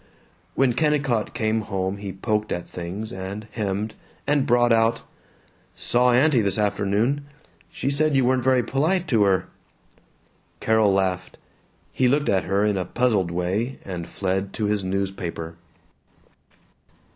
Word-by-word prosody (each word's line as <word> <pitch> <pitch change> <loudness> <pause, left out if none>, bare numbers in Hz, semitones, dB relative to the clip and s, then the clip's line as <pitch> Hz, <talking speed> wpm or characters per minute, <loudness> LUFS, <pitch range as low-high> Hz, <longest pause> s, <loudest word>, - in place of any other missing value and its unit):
When 135 -3 +3
Kennicott 140 -5 0
came 110 0 0
home 95 -2 -2
he 100 -1 -6
poked 105 +2 -2
at 85 - -3
things, 95 +7 -6
and 95 +3 -6
hemmed, 105 0 -2 0.3
and 145 -1 +2
brought 120 -1 +4
out, 115 0 +2 0.7
"Saw 125 +1 +3
aunty, 130 0 +4
this 100 +1 0
afternoon. 105 +7 0 0.4
She 135 - -2
said 150 +1 +2
you 135 -2 +3
weren't 130 0 +2
very 130 -1 +3
polite 170 +9 0
to 110 -5 +4
her." 95 -1 +2 1.1
Carol 110 -2 +3
laughed. 95 -1 -1 0.5
He 130 - +2
looked 145 +3 +2
at 95 -4 +2
her 100 +2 +1
in 105 -2 +1
a 90 - -1
puzzled 105 -3 +1
way 95 +9 -2
and 90 -3 -5
fled 95 +1 -2
to 110 - -2
his 105 -1 0
newspaper. 95 -3 -3
105 Hz, 140 wpm, -24 LUFS, 95-125 Hz, 1.1 s, brought